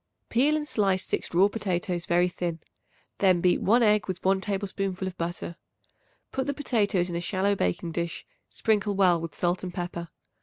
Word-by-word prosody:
Peel 280 +6 +3
and 300 -1 -4
slice 195 -7 +1
6 - - -2
raw 190 +3 +6
potatoes 180 -4 -2
very 175 +1 +3
thin; 175 -2 -3 0.6
then 185 -3 +4
beat 180 0 +2
1 235 +4 +4
egg 210 -1 +3
with 185 -1 -5
1 190 0 +3
tablespoonful 195 -2 -2
of 185 - -5
butter. 170 0 -4 0.7
Put 265 0 -2
the 285 - -1
potatoes 205 -10 +1
into 170 -1 -2
a - - -5
shallow 190 +3 +1
baking 165 - -1
dish, 170 0 -3 0.2
sprinkle 210 -2 +1
well 180 -4 +4
with 165 -3 -6
salt 175 +1 0
and 180 - -4
pepper. 175 -1 -5
185 Hz, 180 wpm, -27 LUFS, 175-205 Hz, 0.7 s, raw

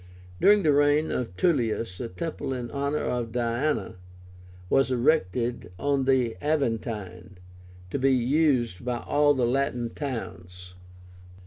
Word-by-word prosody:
During 205 -1 +5
the 150 - +4
reign 145 +2 +3
of 105 -8 -3
Tullius 115 - 0
a 120 - -3
temple 160 0 -4
in 125 -2 -5
honor 140 +2 -1
of 120 -2 -2
DIÁNA 120 -2 -1 0.7
was 135 +6 +3
erected 120 - 0
on 140 +1 0
the 130 -4 +2
Aventine, 110 - -2 0.5
to - - -2
be 135 +1 +3
used 130 - +1
by 125 0 -2
all 145 +4 +2
the 125 -2 +1
Latin 125 -2 -1
towns. 90 - -7
125 Hz, 125 wpm, -26 LUFS, 115-145 Hz, 0.7 s, During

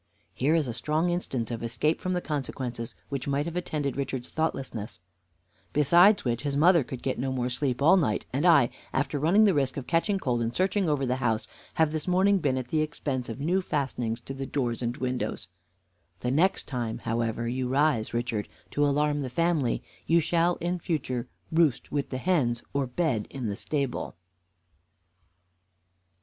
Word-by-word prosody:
Here 145 +5 +2
is 155 -5 +1
a 120 - -3
strong 155 +8 0
instance 130 -10 -2
of 115 - -4
escape 115 +7 0
from 185 - -1
the 180 - 0
consequences 130 -6 -4
which 140 -1 -4
might 140 +1 0
have 170 0 -5
attended 150 -6 -2
Richard's 130 -2 -3
thoughtlessness; 130 - -3 0.7
besides 175 +7 +5
which, 120 -1 0
his 140 -1 -1
mother 170 +1 +5
could 125 0 -8
get 130 - -1
no 130 +1 -1
more 125 -1 -1
sleep 125 +1 -1
all 170 +6 +7
night, 115 - 0
and 140 +4 0
I, 160 -9 +6 0.2
after 145 +2 0
running 175 +9 +5
the 205 -3 +5
risk 135 -3 0
of 135 - -4
catching 180 +5 +1
cold 125 -9 -1
in 115 0 0
searching 190 - +1
over 145 -2 +1
the 125 0 0
house, 110 -3 0 0.3
have 160 -3 +3
this 155 +1 -3
morning 190 +2 +4
been 140 -5 +1
at 125 -1 -4
the 155 +2 +1
expense 140 -5 -3
of 115 - -6
new 175 +7 +1
fastenings 125 -8 -2
to 135 - -7
the 135 0 -5
doors 120 -4 -1
and 120 +1 -2
windows. 125 -8 -3 0.7
The 125 - 0
next 175 +8 +2
time, 120 -4 -3
however, 115 0 -1
you 125 +1 -1
rise, 135 -3 +2
Richard, 120 -3 -2 0.2
to 145 - +1
alarm 145 +1 +2
the 130 - -3
family, 160 -3 +1 0.2
you 170 +1 +5
shall 170 +2 +2
in 175 +1 -2
future 130 -8 -2 0.2
roost 160 -5 +2
with 145 -1 -1
the 130 - -3
hens 130 -7 +1
or 140 -2 0
bed 125 -5 -1
in 130 -3 -5
the 100 -2 -2
stable." 140 +2 -2
140 Hz, 185 wpm, -27 LUFS, 125-160 Hz, 0.7 s, all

